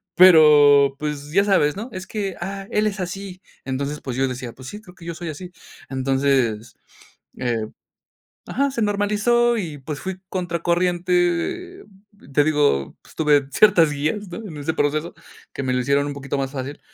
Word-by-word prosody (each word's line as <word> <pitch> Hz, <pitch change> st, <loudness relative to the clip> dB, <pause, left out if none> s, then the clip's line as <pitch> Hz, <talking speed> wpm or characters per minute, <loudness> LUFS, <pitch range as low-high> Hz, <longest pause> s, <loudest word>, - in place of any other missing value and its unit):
pero, 150 Hz, -5 st, +7 dB
pues, 150 Hz, -1 st, -4 dB
ya 200 Hz, +5 st, +4 dB
sabes 165 Hz, -8 st, +2 dB
¿no? 225 Hz, +5 st, -6 dB
Es 185 Hz, -1 st, -6 dB
que, 200 Hz, -4 st, -4 dB
ah, 195 Hz, +2 st, -5 dB
él 210 Hz, -, +1 dB
es 205 Hz, -1 st, -3 dB
así. 185 Hz, 0 st, -6 dB, 0.2 s
Entonces, 140 Hz, +3 st, -3 dB
pues: 130 Hz, -2 st, -5 dB
"Yo 135 Hz, 0 st, +2 dB
decía, 125 Hz, -1 st, -5 dB
pues, 130 Hz, 0 st, -12 dB
sí, 210 Hz, +7 st, -8 dB
creo 180 Hz, -4 st, -16 dB
que 170 Hz, -, -14 dB
yo 170 Hz, -1 st, -5 dB
soy 170 Hz, 0 st, -6 dB
así." 175 Hz, +4 st, -8 dB, 0.4 s
Entonces, 130 Hz, -4 st, 0 dB, 0.6 s
eh, 115 Hz, -3 st, -2 dB, 0.8 s
ajá, 280 Hz, +1 st, 0 dB
se 235 Hz, -4 st, -2 dB
normalizó 210 Hz, +4 st, +2 dB
y, 160 Hz, -7 st, -5 dB
pues, 145 Hz, +2 st, -6 dB
fui 190 Hz, 0 st, -5 dB
contracorriente, 175 Hz, -, -1 dB, 0.5 s
te 145 Hz, -, +4 dB
digo, 145 Hz, -, +1 dB
pues -, -, -19 dB
tuve 145 Hz, -3 st, +3 dB
ciertas 185 Hz, -7 st, +5 dB
guías 155 Hz, +8 st, -2 dB
¿no? 175 Hz, -, -8 dB
En 160 Hz, -, -9 dB
ese 145 Hz, +3 st, -2 dB
proceso, 155 Hz, +3 st, -1 dB, 0.4 s
que -, -, -4 dB
me 130 Hz, -, 0 dB
lo 125 Hz, -, +1 dB
hicieron 140 Hz, +3 st, +1 dB
un 145 Hz, -, -3 dB
poquito 140 Hz, 0 st, -4 dB
más 135 Hz, 0 st, -3 dB
fácil. 140 Hz, +1 st, -6 dB
160 Hz, 175 wpm, -22 LUFS, 140-190 Hz, 0.8 s, pero